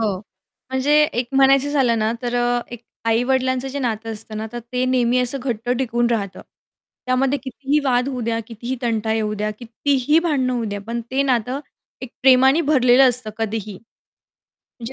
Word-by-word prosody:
हो. 205 -4 -1 0.5
म्हणजे 260 +3 0
एक 245 -4 -3
म्हणायचं 275 +1 +4
झालं 250 -6 +2
ना, 220 +1 0
तर 245 0 -3
अ, 245 0 +1
एक 240 -1 -9 0.2
आई-वडिलांचं 260 +3 +1
जे 280 +2 -5
नातं 225 -3 -3
असतं 215 0 -5
ना, 220 +1 -4
तर 240 - -5
ते 250 0 0
नेहमी 250 -1 +2
असं 250 +2 +3
घट्ट 240 -2 -4
टिकून 240 -2 0
राहतं. 200 -5 -2 0.7
त्यामध्ये 260 +2 +1
कितीही 275 +3 -1
वाद 250 0 +1
होऊ 255 -3 -4
द्या, 225 - 0
कितीही 235 +3 -5
तंटा 220 -2 -1
येऊ 215 -1 -1
द्या, 210 +1 -2
कितीही 265 +5 +1
भांडणं 285 -7 0
होऊ 240 -2 -2
द्या, 205 -1 -4
पण 235 +1 -3
ते 265 +2 +1
नातं 255 0 -1 0.4
एक 255 - -7
प्रेमानी 265 +3 +5
भरलेलं 265 -4 +4
असतं, 245 -3 +4
कधीही. 215 -3 -4 1.0
म्हणजे 240 +2 -7
245 Hz, 175 wpm, -20 LUFS, 225-265 Hz, 1.0 s, प्रेमानी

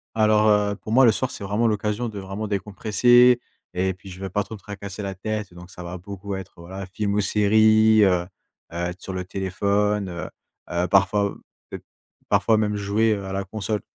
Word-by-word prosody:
Alors, 110 -1 +4
heu, 105 -1 +2
pour 110 - -9
moi, 130 +3 +6
le 115 - +7
soir, 125 +4 -2
c'est 115 - -8
vraiment 105 +4 +1
l'occasion 105 +2 -1
de 105 -2 -7
vraiment 95 +3 -5
décompresser. 110 +5 +4 0.3
Et 95 +1 0
puis, 95 +2 -14
je 90 0 -10
vais 95 0 -5
pas 105 +3 0
trop 110 - -9
me - - -13
tracasser 100 0 -8
la 100 -1 -3
tête 105 0 -4
donc 90 0 -12
ça 90 - -10
va 85 +1 -6
beaucoup 100 +1 -7
être, 95 -1 -8
voilà, 95 +3 -8
film 100 +2 -3
ou 105 - +2
série, 110 +1 +4
heu 95 - +5
heu, - - -13 0.4
être 90 +2 -4
sur 95 - -6
le 90 0 -4
téléphone, 100 +2 -1
heu 85 -1 -6 0.4
heu, 85 +1 0
parfois, 100 +2 +3
heu, - - -14 0.3
peut-être - - -8 0.5
parfois 110 - +3
même 105 -1 0
jouer, 105 +2 +1
heu, 100 -2 -4
à 95 - -5
la 100 0 -2
console. 105 +2 -3
100 Hz, 210 wpm, -23 LUFS, 95-110 Hz, 0.5 s, le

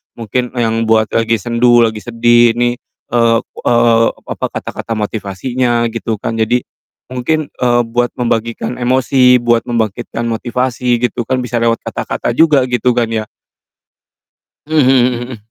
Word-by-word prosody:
mungkin 120 +2 -3
e 120 - 0
yang 115 0 0
buat 110 -1 +2
lagi 115 0 +1
sendu, 120 +2 +3
lagi 110 -1 -1
sedih, 120 0 +3
ini, 120 0 0 0.3
eee 115 -1 +3
eee, 115 -1 +2 0.2
apa, - - -3
kata-kata 115 - -6
motivasinya, 115 +4 -2
gitu 115 -1 -3
kan. 115 +2 -4
Jadi 120 +3 +1 0.5
mungkin, 145 +5 -2
eee, 120 -1 +1
buat 120 +1 -1
membagikan 115 0 -2
emosi, 125 0 +3
buat 120 -1 +2
membangkitkan 115 0 -2
motivasi, 120 +1 -1
gitu 120 - -5
kan, 130 -1 -1
bisa 120 -1 -2
lewat 115 0 +1
kata-kata - - -3
juga, 155 -5 +4
gitu 125 0 +1
kan, 120 -2 +1
ya. 110 -1 -2 1.4
Mmm, 160 - 0
mhm 135 -2 +5 0.2
mhm 120 - -5
mhm. 125 -3 -8
120 Hz, 145 wpm, -15 LUFS, 115-125 Hz, 1.4 s, mhm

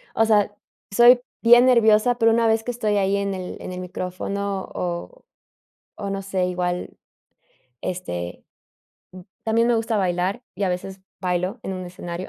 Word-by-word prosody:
o 225 - +4
sea, 210 -2 +3 0.4
soy 240 +2 +7 0.2
bien 240 +2 +7
nerviosa, 235 -1 +4
pero 225 -1 +4
una 230 0 +2
vez 220 0 +3
que 245 - -1
estoy 215 -3 0
ahí 195 0 +2
en 200 0 -1
el 185 -1 -6
en - - -6
el 180 - -6
micrófono, 190 +2 -4
o 180 - -5 0.7
o 200 -2 -5
no 195 0 -3
sé, 190 -2 -1
igual 180 0 -3 0.8
este, 90 - -5 1.0
también 230 +1 +2
me 240 - +3
gusta 225 -1 0
bailar 185 +5 -1
y 200 - -5
a 190 - +2
veces 190 +2 -5 0.2
bailo 185 +5 -1
en 190 - -4
un 185 0 -5
escenario. 175 0 -7
195 Hz, 160 wpm, -23 LUFS, 180-225 Hz, 1.0 s, soy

